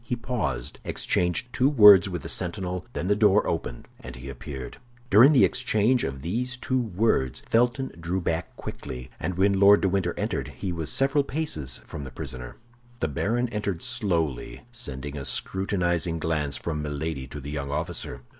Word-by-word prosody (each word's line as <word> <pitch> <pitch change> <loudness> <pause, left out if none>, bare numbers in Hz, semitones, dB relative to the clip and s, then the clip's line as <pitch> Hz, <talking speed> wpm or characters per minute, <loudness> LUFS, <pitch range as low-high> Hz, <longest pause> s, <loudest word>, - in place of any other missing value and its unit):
He 120 - -2
paused, 105 - -3
exchanged 90 +8 0
two 130 +2 +3
words 105 -8 +8
with 90 -4 -5
the - - -5
sentinel; 90 +2 -3
then 90 - -3
the 105 - +3
door 105 -1 +4
opened, 65 -7 -3
and - - -9
he 65 +2 -9
appeared. 65 0 -7 0.3
During 115 +9 +8
the 140 - +6
exchange 125 0 +2
of 70 0 -4
these 125 +9 -2
two 130 0 0
words 95 - 0
Felton 120 +3 +1
drew 85 +3 -2
back 85 -1 -2
quickly, 65 0 -7
and 90 - -3
when 100 0 +3
Lord 100 +1 +7
de 95 - +2
Winter 90 -2 0
entered, - - -2
he 95 - -3
was 80 -2 -3
several 140 +2 +2
paces 130 - -2
from - - -7
the 65 - -7
prisoner. 65 -1 -7 0.4
The 80 - 0
baron 120 - 0
entered 105 -6 -3
slowly, 90 - -1
sending 75 - -6
a 70 - -5
scrutinizing 85 +1 0
glance 75 -4 -1
from 75 0 -3
Milady 75 -2 -4
to 75 - -8
the 70 +1 -7
young 70 -2 -4
officer. 75 -4 -4
90 Hz, 175 wpm, -26 LUFS, 75-110 Hz, 0.4 s, words